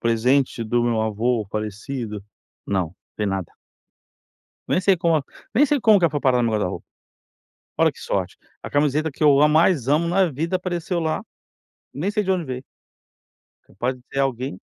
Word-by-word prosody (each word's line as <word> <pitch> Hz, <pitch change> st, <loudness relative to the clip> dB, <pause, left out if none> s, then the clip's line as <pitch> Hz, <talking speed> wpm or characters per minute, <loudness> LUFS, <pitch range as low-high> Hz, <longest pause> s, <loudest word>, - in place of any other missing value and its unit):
Presente 120 Hz, +1 st, +1 dB
do 120 Hz, +2 st, +1 dB
meu 115 Hz, -2 st, +1 dB
avô 110 Hz, +1 st, 0 dB
falecido, 105 Hz, +1 st, -4 dB, 0.4 s
não 95 Hz, -2 st, +1 dB
não 85 Hz, -, -20 dB, 0.2 s
tem 105 Hz, -, -1 dB
nada. 95 Hz, -3 st, -3 dB, 1.2 s
Nem -, -, +2 dB
sei 190 Hz, 0 st, +3 dB
como 165 Hz, -4 st, +1 dB, 0.3 s
nem 275 Hz, +7 st, +6 dB
sei 290 Hz, -1 st, +1 dB
como 220 Hz, -3 st, +6 dB
que 180 Hz, -, +1 dB
ela 165 Hz, -, +4 dB
foi 145 Hz, -2 st, -2 dB
parar 130 Hz, -2 st, +3 dB
no -, -, +2 dB
meu 115 Hz, -, 0 dB
guarda-roupa. 105 Hz, -4 st, -2 dB, 0.9 s
Olha -, -, +4 dB
que -, -, -18 dB
sorte. -, -, -2 dB, 0.3 s
A -, -, -6 dB
camiseta 150 Hz, +2 st, +1 dB
que 140 Hz, -, -8 dB
eu 145 Hz, -2 st, +6 dB
a 150 Hz, -, +6 dB
mais 155 Hz, -4 st, +3 dB
amo 155 Hz, +4 st, +3 dB
na 185 Hz, +2 st, +3 dB
vida 165 Hz, +6 st, -1 dB
apareceu 180 Hz, 0 st, -3 dB
lá, 160 Hz, -1 st, -1 dB, 0.7 s
nem 170 Hz, +8 st, -2 dB
sei 210 Hz, 0 st, 0 dB
de 190 Hz, -, 0 dB
onde 180 Hz, -4 st, 0 dB
veio. 130 Hz, 0 st, -6 dB, 1.0 s
É -, -, -42 dB
capaz 120 Hz, +7 st, -2 dB
de -, -, -19 dB
ser -, -, -21 dB
de 140 Hz, -, +1 dB
alguém, 130 Hz, -6 st, -2 dB
135 Hz, 190 wpm, -22 LUFS, 115-170 Hz, 1.2 s, nem